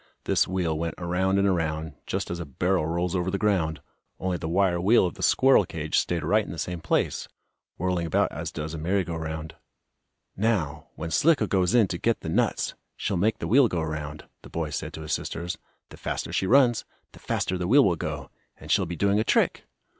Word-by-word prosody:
This - - +2
wheel 85 -4 -1
went 85 -1 -2
around 90 +2 0
and 100 0 +3
around, 80 -4 -1
just - - -2
as 85 - -3
a 85 - -4
barrel 90 +4 0
rolls 85 +2 -1
over 90 0 0
the 100 - -1
ground, 95 -7 0 0.4
only 95 -1 -1
the 80 -2 -4
wire 90 -1 +2
wheel 105 +3 +5
of 90 - -2
the - - -11
squirrel 135 -5 +5
cage 80 -3 -1
stayed 85 -3 -1
right 105 +8 +3
in - - -8
the 85 - -7
same 90 +1 -4
place, 80 - 0 0.5
whirling 90 -1 -1
about 80 - +2
as - - -5
does 75 +1 -5
a 80 - -5
merry 95 +5 +1
go 85 -1 -5
round. 80 -1 -5 0.8
"Now, 90 -9 0
when 80 +1 -5
Slicko 145 - +4
goes 95 0 +1
in 115 -5 +5
to 85 - -3
get 115 -2 +1
the 80 - -5
nuts, - - +1 0.2
she'll 100 - -1
make 105 +5 +1
the - - -4
wheel 130 +2 +6
go 85 -6 -2
around," 75 -1 -5 0.2
the - - -13
boy 80 -2 -3
said - - -4
to 80 - -7
his 80 - -3
sisters. 85 +1 -3 0.3
"The - - -12
faster - - -4
she 95 - +1
runs, 125 -1 +4 0.3
the - - -15
faster 95 - -1
the 90 -1 -2
wheel 135 +6 +6
will 90 - +3
go, 75 -4 -5 0.3
and - - -7
she'll - - +3
be 85 - -4
doing 100 +4 +2
a - - +2
trick." - - +1
90 Hz, 220 wpm, -26 LUFS, 80-100 Hz, 0.8 s, wheel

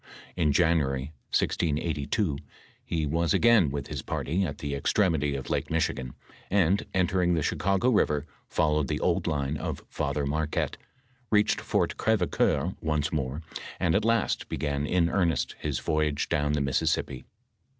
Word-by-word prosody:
In 80 -4 +2
January, 70 -3 +1 0.2
1682, 75 +1 0 0.4
he 80 -2 -1
was 80 +3 +1
again 115 -9 +5
with 70 +1 -4
his - - -5
party 85 +7 -2
at 70 -6 -3
the 70 -1 -4
extre/bity 75 -1 +1
of 65 - -6
Lake - - -1
Michigan, 65 -6 -1 0.3
and 100 0 +2
enter 95 0 +1
ing 90 -1 +3
the 80 - 0
Ohioago 100 - +1
river, 75 -5 +2 0.2
followed 75 -2 +1
the - - -1
old 90 0 +1
line 75 -2 -1
of - - -4
Father 70 0 -2
Mar^ 75 +2 0
quette, - - -1 0.5
reached 105 -1 +3
Fort - - 0
Orev^coeur 105 -5 +1
once 75 0 -1
more, 70 +1 -2 0.4
and 85 -3 +2
at 100 - +2
last 115 -1 +1
began 70 -1 -2
in 85 0 +2
earnest 85 -3 0
his 75 -3 -2
Toyage 75 -2 0
down 75 0 +1
the 75 - +1
Mississippi. 65 -1 0
80 Hz, 150 wpm, -27 LUFS, 70-90 Hz, 0.5 s, again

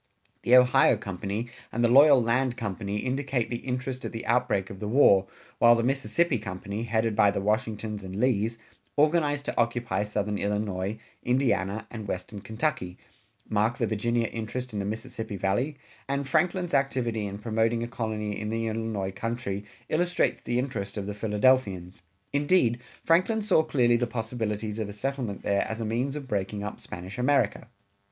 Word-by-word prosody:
The 125 - +5
Ohio 125 -2 +6
Company 100 +3 -4 0.2
and 120 - 0
the - - +6
Loyal 135 +1 +7
Land 120 +2 +1
Company 105 -2 -3
indicate 130 +1 -1
the 120 - -1
interest 130 +1 -4
at - - -4
the 115 - -6
outbreak 120 -5 +1
of 95 - -9
the 105 - -4
war, 100 -6 +5 0.3
while 120 0 +7
the 115 - 0
Mississippi 135 +2 +1
Company, 100 +1 -5
headed 110 -1 0
by 100 - +5
the 100 - -1
Washingtons 105 0 -1
and 95 0 -7
Lees, 115 0 +1 0.4
organized 145 -1 +2
to - - -4
occupy 115 -4 0
southern 105 0 -2
Illinois, 100 0 -1 0.2
Indiana, 110 -5 +1
and 110 -3 -6
western 95 +2 -5
Kentucky, 110 - -2 0.5
mark 110 +4 +1
the 120 - +1
Virginia 115 +2 0
interest 115 +2 -5
in 105 - -2
the 100 - -2
Mississippi 110 0 -5
Valley, 120 +10 0 0.3
and 140 0 -1
Franklin's 175 +5 +1
activity 125 -6 0
in 100 0 -6
promoting 115 +1 0
a - - -3
colony 110 -4 -3
in 105 0 -3
the 115 +1 -1
Illinois 110 -3 -2
country 105 -1 -4 0.2
illustrates 175 +3 +1
the 120 - -1
interest 115 -6 -3
of 100 - -3
the 105 - -4
Philadelphians. 105 -4 +1 0.3
Indeed, 145 -5 +3 0.2
Franklin 185 +7 +3
saw 195 -6 +4
clearly 120 -6 +3
the 120 0 0
possibilities 110 -2 -3
of 110 -2 -2
a - - -6
settlement 125 -2 -3
there 100 0 +2
as 110 +1 -4
a 115 - -2
means 125 +6 -1
of 145 -3 -6
breaking 100 -2 -2
up 105 - -5
Spanish 90 +6 -8
America. 135 -2 +2
115 Hz, 170 wpm, -27 LUFS, 105-130 Hz, 0.5 s, Loyal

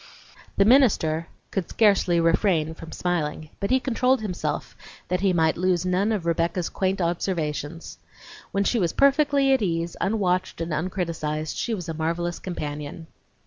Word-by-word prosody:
The 195 - +5
minister 195 - +4 0.2
could 190 -4 -2
scarcely 200 -5 +3
refrain 165 -1 +2
from 160 0 -11
smiling, 155 -3 -2
but 200 - -2
he 260 +1 +4
controlled 255 0 +1
himself 190 -5 -3 0.3
that 180 - +1
he 195 -1 +3
might 160 -2 +2
lose 180 0 +1
none 185 +4 +1
of 205 -6 -1
Rebecca's 170 +1 0
quaint 190 0 -1
observations. 170 -3 -3 0.5
When 200 - +1
she 235 +4 +1
was 175 -4 0
perfectly 280 -1 +4
at 265 - +2
ease, 170 -3 -1
unwatched 185 -4 0
and 165 -1 -3
uncriticised, 155 -2 -2
she 230 - -1
was 180 -4 -6
a 165 - -3
marvelous 170 +2 -2
companion. 150 -2 -5
175 Hz, 150 wpm, -25 LUFS, 165-200 Hz, 0.5 s, The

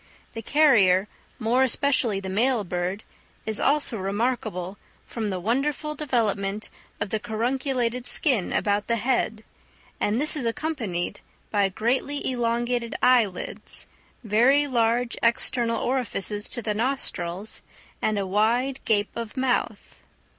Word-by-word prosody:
The 225 - -5
carrier, 210 -9 +4 0.3
more 235 +4 +2
especially 255 -5 +2
the 195 - -6
male 225 +4 +1
bird, 180 +3 -3 0.4
is 220 -1 -2
also 280 -4 +2
remarkable 200 -2 -2 0.3
from 220 -3 -4
the 185 -2 -2
wonderful 275 - -1
development 215 -8 -1 0.3
of 205 -1 -3
the 220 - 0
carunculated 245 +2 -1
skin 250 - +1
about 205 0 0
the 235 - +2
head, 225 -1 0 0.6
and 210 +3 +1
this 305 +3 +3
is 265 -6 -2
accompanied 230 - -3 0.3
by 200 -2 +2
greatly 255 +8 -1
elongated 240 0 -1
eyelids, 230 -8 +2 0.4
very 245 +7 +4
large 235 -2 +1
external 230 0 +1
orifices 215 -5 -1
to 240 - -2
the 210 - 0
nostrils, 210 -6 -1 0.4
and 215 -1 +1
a 200 - -1
wide 235 +7 +1
gape 205 -3 +1
of 230 -1 -6
mouth. 255 -1 -1
230 Hz, 125 wpm, -25 LUFS, 205-255 Hz, 0.6 s, carrier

